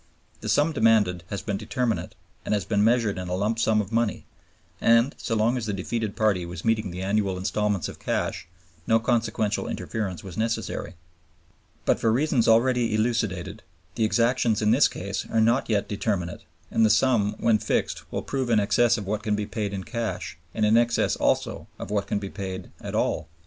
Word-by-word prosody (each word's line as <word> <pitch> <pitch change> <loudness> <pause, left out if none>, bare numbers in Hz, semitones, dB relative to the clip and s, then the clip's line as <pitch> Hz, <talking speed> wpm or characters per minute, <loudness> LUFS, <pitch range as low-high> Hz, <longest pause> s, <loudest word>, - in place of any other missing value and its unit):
The - - -5
sum 150 +3 +3
demanded 110 - +3
has 100 - -4
been 100 -3 -2
determinate 115 +3 -2 0.3
and - - 0
has 100 - -2
been 105 -2 +1
measured 115 -4 +2
in 90 - -5
a 90 - -1
lump 105 +4 0
sum 110 -1 +3
of 100 0 -7
money; 115 -1 0 0.6
and 115 +4 +4
so 115 - -3
long 115 +4 +2
as 115 -3 -3
the 105 - -1
defeated 105 +2 -3
party 105 -5 +2
was 85 +2 -7
meeting 110 -3 +1
the 90 +1 -5
annual 100 -1 0
instalments 105 0 -1
of - - -9
cash - - -2 0.4
no 115 - +5
consequential 110 -3 0
interference 95 -6 -4
was 95 0 -7
necessary. 110 -4 -2 0.9
But - - +2
for 115 - +2
reasons 130 0 +2
already 115 0 +3
elucidated, 110 -3 -1 0.3
the 110 - -1
exactions 115 0 +2
in 105 0 +2
this 125 +2 +5
case 100 +2 -5
are 115 - +1
not 115 +3 +2
yet 105 -2 +1
determinate, 100 -4 -2 0.3
and 115 - +3
the 110 - +5
sum 110 -2 +3
when 110 -2 +3
fixed - - -2
will - - -3
prove 130 -3 -2
in 115 -2 +4
excess 120 +3 +3
of 105 - -5
what 105 +2 -2
can 105 -1 0
be 105 0 -2
paid 105 -2 -3
in 95 -1 -4
cash 115 -7 -4 0.2
and 110 - +2
in 110 +2 +5
excess 120 0 +2
also - - 0
of - - -7
what 100 -1 0
can - - 0
be 100 -1 -5
paid 95 -2 -6
at - - -5
all. 80 - 0
110 Hz, 195 wpm, -25 LUFS, 100-115 Hz, 0.9 s, no